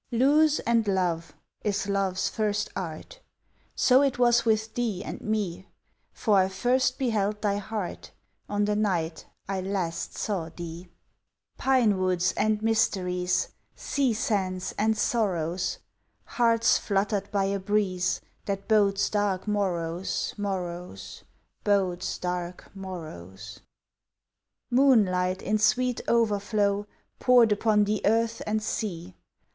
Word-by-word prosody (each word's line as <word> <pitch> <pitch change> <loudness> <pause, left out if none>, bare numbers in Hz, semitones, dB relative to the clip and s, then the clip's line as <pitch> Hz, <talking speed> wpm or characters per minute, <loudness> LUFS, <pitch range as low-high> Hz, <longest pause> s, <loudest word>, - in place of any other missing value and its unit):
"Lose 290 +5 +4
and 230 -2 +1
love" 175 -4 -1 0.3
is 205 -1 -1
love's 195 -2 0
first 210 -1 -1
art; 185 - -6 0.6
So 255 +1 +5
it 275 -3 +1
was 240 -1 +4
with 220 0 +1
thee 220 -6 -2
and - - -7
me, 200 -4 -2 0.4
For 210 -3 +2
I 185 - +3
first 250 +6 +1
beheld 210 -4 -1
thy 200 -1 +1
heart 205 -1 -5 0.4
On 205 0 +1
the 210 0 0
night 175 -6 -1 0.2
I 195 -1 -2
last 180 -3 -3
saw 185 -6 -2
thee. 170 +1 -8 0.7
Pine 245 -7 +3
woods 185 -1 +1
and 215 0 +1
mysteries! 185 -5 +1 0.3
Sea 275 -3 0
sands 190 -4 -1
and 220 +1 +1
sorrows! 180 -6 0 0.5
Hearts 230 -1 +3
fluttered 200 0 -1
by 200 -2 +1
a 195 0 -1
breeze 190 -2 0 0.2
That 195 -1 -3
bodes 205 -2 +3
dark 205 -2 -1
morrows, 180 -4 -1
morrows, 175 - -5 0.4
Bodes 190 -3 0
dark 180 0 -4
morrows! 105 - -8 1.1
Moonlight 195 -9 +3
in 215 0 +1
sweet 250 +3 +2
overflow 205 -2 +1 0.3
Poured 245 -3 +5
upon 210 0 +3
the 210 0 -1
earth 230 +2 +1
and 215 0 0
sea! 185 -5 -4
200 Hz, 120 wpm, -27 LUFS, 185-220 Hz, 1.1 s, So